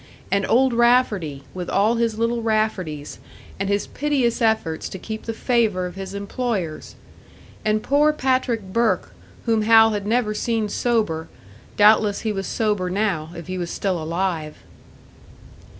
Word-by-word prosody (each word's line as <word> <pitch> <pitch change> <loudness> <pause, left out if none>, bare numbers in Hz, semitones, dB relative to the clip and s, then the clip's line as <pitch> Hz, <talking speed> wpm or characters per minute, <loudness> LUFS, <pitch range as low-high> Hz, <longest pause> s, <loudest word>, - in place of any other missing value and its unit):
And 195 0 +1
Old 260 +1 +4
Rafferty, 230 - +2
with 180 -1 -5
all 210 +4 +3
his 230 -2 0
little 230 +1 0
Rafferties, 210 -10 -2 0.4
and 195 0 -1
his 200 0 0
piteous 265 -5 0
efforts 220 -8 0
to - - -7
keep 220 +4 -7
the 230 - -2
favour 225 -5 +1
of 180 - -6
his 195 +1 -7
employers! 200 -5 -3 0.7
And 215 0 +1
poor 295 +2 +3
Patrick 255 -5 0
Burke, 225 -6 +1 0.3
whom 225 -2 +2
Hal 225 +1 +6
had 205 -1 -3
never 225 -1 +1
seen 220 0 -1
sober; 210 -11 0 0.5
doubtless 210 -1 +5
he 220 - -1
was 195 -2 -3
sober 210 -5 0
now, 185 -5 -1
if 170 -1 -8
he 185 0 -4
was 175 -1 -3
still 185 -3 -2
alive! 165 -1 -2
215 Hz, 150 wpm, -22 LUFS, 185-230 Hz, 0.7 s, Hal